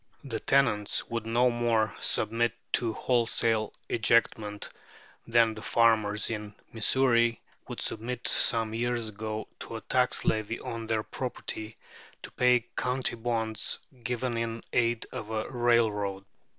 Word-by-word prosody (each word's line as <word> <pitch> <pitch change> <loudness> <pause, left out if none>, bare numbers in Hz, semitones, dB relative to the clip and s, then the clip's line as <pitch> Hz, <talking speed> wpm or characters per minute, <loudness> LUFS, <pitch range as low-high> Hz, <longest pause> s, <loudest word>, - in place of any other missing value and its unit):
The 115 -6 -4
tenants 115 -7 +2
would 115 -1 -3
no 120 +2 +3
more 115 -3 +1
submit 115 +1 +2 0.2
to 115 -2 +1
wholesale 115 -2 +1 0.2
ejectment 110 -2 +1 0.6
than 115 -1 +4
the 110 - -8
farmers 110 -2 +2
in 105 -1 -5 0.2
Missouri 115 0 +3 0.3
would - - -6
submit 120 +2 -2
some 115 -2 +2
years 120 -1 -1
ago 110 +1 -5
to - - -7
a 110 - -5
tax 125 -1 +1
levy 110 +1 0
on 115 -1 -5
their 110 -1 0
property 110 -3 -4 0.5
to - - -8
pay 125 -1 +3
county 125 0 -1
bonds 110 -2 -1 0.3
given 125 0 -2
in 115 0 -3
aid 115 -1 +1
of 110 - -6
a 110 -1 -2
railroad. 110 -5 +1
115 Hz, 130 wpm, -29 LUFS, 110-120 Hz, 0.6 s, than